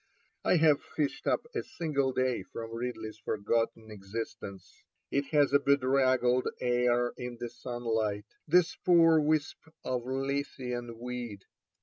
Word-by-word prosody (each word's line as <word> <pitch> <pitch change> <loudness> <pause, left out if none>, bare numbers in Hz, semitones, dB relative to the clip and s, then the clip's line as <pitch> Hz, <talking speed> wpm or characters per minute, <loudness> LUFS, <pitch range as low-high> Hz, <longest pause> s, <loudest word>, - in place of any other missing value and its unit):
I - - +4
have 155 -3 +4
fished 150 -3 -3
up - - +1
a 430 - -1
single 150 - -1
day 130 -1 0
from 115 0 -8
Ridley's 115 -2 -5
forgotten 110 +1 -1
existence. 100 -1 -7 0.3
It 140 0 +1
has 145 -2 +3
a 140 - +7
bedraggled 130 -2 +3
air 120 0 +2
in 125 -1 -6
the 120 - -4
sunlight, 115 -4 -2 0.2
this 175 +2 +4
poor 165 -2 +5
wisp 150 -1 +1 0.2
of 125 -1 -2
Lethean 130 -3 -3
weed. 120 -4 -6
125 Hz, 125 wpm, -30 LUFS, 115-140 Hz, 0.3 s, a